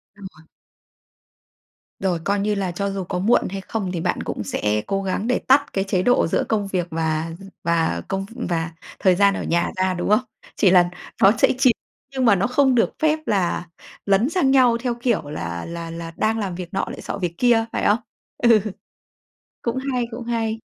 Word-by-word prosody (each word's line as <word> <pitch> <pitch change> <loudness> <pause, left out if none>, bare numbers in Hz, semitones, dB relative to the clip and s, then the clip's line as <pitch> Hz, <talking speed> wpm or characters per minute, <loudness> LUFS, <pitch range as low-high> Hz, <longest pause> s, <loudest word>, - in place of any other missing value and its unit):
Đúng 200 -2 -10
rồi. 160 +1 -19 1.5
Rồi, 185 -3 0
coi 200 0 +1
như 210 +1 +1
là 195 -3 -2
cho 200 +3 -2
dù 195 -1 -3
có 180 +1 -3
muộn 210 +7 +2
hay 195 +1 -4
không 190 -2 -4
thì 170 - -3
bạn - - -1
cũng - - -4
sẽ 105 +2 -1
cố 195 0 -1
gắng 195 +3 -2
để 250 - +2
tắt 270 +2 +3
cái 195 0 0
chế 185 -2 0
độ 245 -5 +3
giữa - - 0
công 210 -3 0
việc 185 -3 -1
và 160 0 -1 0.3
và 165 -1 +1
công 195 0 -2
v 230 - -15
và 165 -1 -1 0.3
thời 185 -2 +4
gian 200 0 +4
ở - - -3
nhà 170 +1 0
ra, 185 0 +1
đúng 175 - -3
không? 215 +3 +5 0.4
Chỉ 190 - +4
là 175 -1 +5 0.3
nó 195 - +8
sẽ - - +5
chìm 260 -2 +5 0.4
nhưng 260 -1 -1
mà 225 -4 +6
nó 195 +3 +1
không 260 +1 +3
được 230 - +3
phép 310 0 +3
là 180 -3 0 0.4
lấn 200 +5 +3
sang 330 -7 +2
nhau 255 -3 +5
theo, 245 -1 -1
kiểu, 235 -8 +1
là 85 - -4
là 170 0 -6
là 165 0 -7
đang 225 +1 +1
làm 195 -4 -3
việc 175 -1 -6
nọ 195 - +1
lại - - -7
xọ - - -5
việc 175 -3 -2
kia, 235 -2 +4
phải - - -1
không? 210 +3 +4 0.4
Ừ. 230 -3 +5 1.0
Cũng 235 +1 -2 0.2
hay, 245 -1 0
cũng 235 +1 -7
hay. 225 -1 -2
195 Hz, 210 wpm, -22 LUFS, 175-230 Hz, 1.5 s, nó